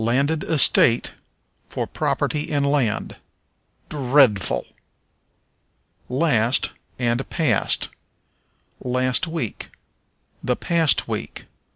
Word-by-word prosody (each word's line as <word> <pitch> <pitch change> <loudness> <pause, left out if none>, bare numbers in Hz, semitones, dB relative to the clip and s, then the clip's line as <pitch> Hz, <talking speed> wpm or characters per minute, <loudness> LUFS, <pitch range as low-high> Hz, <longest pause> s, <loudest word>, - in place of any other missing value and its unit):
Landed 140 +7 +1
Estate 130 -6 +4 0.6
for - - -3
Property 150 -1 -2
in 145 -1 0
Land. 140 -6 0 0.7
Dreadful! 130 - +2 1.4
Last 125 -3 +2 0.3
and 120 +1 -1
Past. 150 - +1 0.9
"Last 130 +5 0
week." 160 -10 -5 0.7
"The 125 - 0
past 165 -2 +2
week." - - -5
130 Hz, 75 wpm, -22 LUFS, 120-150 Hz, 1.4 s, Estate